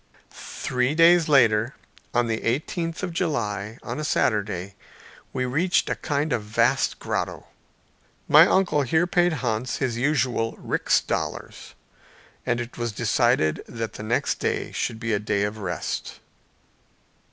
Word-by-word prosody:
Three 125 +3 -2
days 165 0 +5
later, 120 -4 +4 0.4
on 120 - +2
the 115 -1 -2
eighteenth 165 +7 -2
day - - -1
of 175 - -6
July, 110 - -2
on - - -5
a - - -3
Saturday, 105 -8 0 0.6
we 130 - -2
reached 165 +9 +1
a - - 0
kind 145 +1 -1
of 115 - 0
vast 105 +1 +1
grotto. - - -3 0.8
My - - +8
uncle 180 -6 +2
here 160 +6 +2
paid 175 0 +2
Hans 120 +2 -1
his 125 -4 -1
usual 125 -4 0
rix - - +1
dollars, - - -5 0.7
and 120 - +1
it 120 0 -7
was 120 -1 -1
decided 80 -6 +1
that 115 -1 -5
the - - -8
next 110 +3 -1
day - - -2
should 110 - -3
be 115 -1 -2
a 105 - +1
day 100 -1 0
of 105 +1 -3
rest. 90 -4 -4
120 Hz, 145 wpm, -24 LUFS, 110-150 Hz, 0.8 s, My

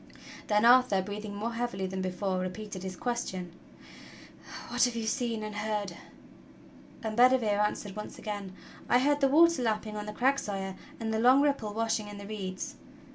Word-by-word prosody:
Then 210 +1 +3
Arthur, 240 -6 +6
breathing 205 +1 -6
more 225 +3 -3
heavily 230 -5 -2
than 190 0 -3
before, 185 0 -1
repeated 185 +1 -5
his 190 0 -5
question: 185 -6 -3 1.2
"What 245 +1 +3
have 245 -1 -2
you 230 -1 -2
seen 230 -1 -1
and 210 -1 -5
heard?" 210 -3 -2 1.1
And 220 -1 -3
Bedivere 240 -4 +4
answered 210 -1 -2
once 210 - -7
again: 205 -3 -5 0.4
"I - - +6
heard 290 +3 +2
the 275 - +5
water 335 +2 +5
lapping 215 -2 -1
on 210 0 -5
the - - -3
crags. 270 +5 +2
Sire, 195 -2 -4 0.2
and 220 -1 -2
the 220 - +1
long 255 +4 +6
ripple 275 -8 0
washing 225 -1 0
in 205 0 -8
the 200 - -8
reeds." 195 -3 -5
215 Hz, 175 wpm, -30 LUFS, 200-240 Hz, 1.2 s, Arthur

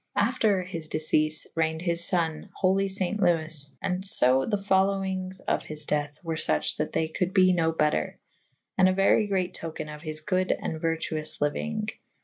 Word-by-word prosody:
After 205 -3 +2
his 170 -4 -5
deceafe 155 0 +2
reigned 160 0 -1
his 170 -1 +3
fo«ne 165 -4 -1
/ - - -34
holy 195 +1 +2
faint 195 +2 -2
Lewes 160 -5 +1
/ - - -50
and 185 0 -2
fo 130 -8 +4
the 210 - 0
folowinges 190 -1 0
of - - 0
his 155 0 -4
dethe 145 0 -2
were 165 -2 -3
fuche 75 - +1
that - - -2
they 160 - 0
colde 180 +4 -3
be 185 -1 +5
no 165 -2 +1
better 150 - 0 0.3
/ - - -49
and 185 0 +6
a - - +1
very 195 +2 +3
great 185 -2 -1
toke« 165 -1 -7
of 150 0 -8
his 155 -1 -5
good 185 +2 0
and 160 -1 -3
vertuoufe 160 -1 -2
lyuynge. 215 +9 -2
175 Hz, 185 wpm, -26 LUFS, 155-190 Hz, 0.3 s, and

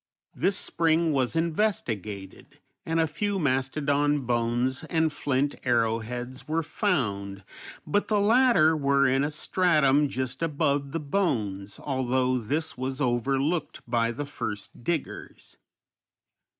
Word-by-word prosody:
This 190 +9 +1
spring 165 -2 +1
was 130 +1 0
investigated, 120 - -2 0.3
and 165 0 +1
a 165 - +4
few 200 +6 -2
mastodon 145 0 +1
bones 120 +1 0
and 160 -2 +1
flint 145 0 0
arrowheads 120 +1 -1
were 160 +2 0
found, 100 - -1 0.4
but 205 +7 0
the 210 -2 +2
latter 205 -7 +5
were 140 -2 +2
in 135 +2 +2
a 145 - 0
stratum 150 -3 +2
just 130 +2 -4
above 140 -3 0
the 165 - -2
bones, 110 - -2
although 130 -1 0
this 150 +8 -2
was 130 +2 -4
overlooked 135 +5 0
by 115 -1 +1
the 145 +5 -4
first 105 -6 -6
diggers. 165 +2 -4
140 Hz, 120 wpm, -27 LUFS, 125-160 Hz, 0.4 s, latter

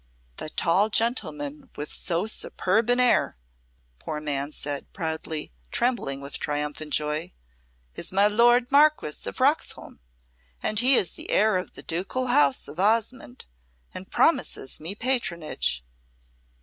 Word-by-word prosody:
"The - - -5
tall 190 +7 +2
gentleman 155 - -1
with 150 +1 -6
so 175 +2 -1
superb 220 0 0
an 245 +1 +3
air," 250 - +3 0.6
the - - -22
poor 150 - -4
man 145 -1 -2
said, 145 -1 -4
proudly, 160 -2 -4 0.2
trembling 235 - -1
with 140 0 -3
triumphant 150 +1 -3
joy, 150 +4 -1 0.6
"is - - -4
my 195 +2 +4
lord 240 +4 +4
Marquess 290 - +3
of 95 - -6
Roxholm, - - 0 0.6
and 215 - +2
he 255 +3 +6
is 190 - +2
the - - -8
heir 215 0 +4
of 185 - -3
the - - -10
ducal 195 +10 -2
house 140 -2 +3
of 150 +4 -10
Osmonde, 215 - 0 0.5
and - - -9
promises 130 - +1
me 170 +6 -4
patronage." 170 - -1
175 Hz, 135 wpm, -25 LUFS, 150-225 Hz, 0.6 s, he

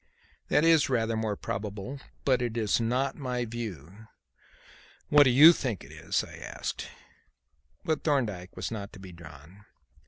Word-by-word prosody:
"That 150 - +3
is 165 -4 +4
rather 115 -3 0
more 110 -2 -1
probable, 105 +7 -5 0.3
but 130 -3 +3
it 120 -1 -2
is 110 0 +1
not 125 +4 0
my 125 -3 -2
view." 110 -3 -8 1.0
"What 145 -1 +7
do - - +5
you 150 +7 +9
think 125 - -3
it - - -13
is?" - - -2
I - - -11
asked. - - -5 1.0
But 160 -1 -1
Thorndyke 110 - -1
was - - -4
not 100 -3 -6
to 100 - -12
be 95 -1 -10
drawn. 85 +3 -14
115 Hz, 155 wpm, -28 LUFS, 100-130 Hz, 1.0 s, you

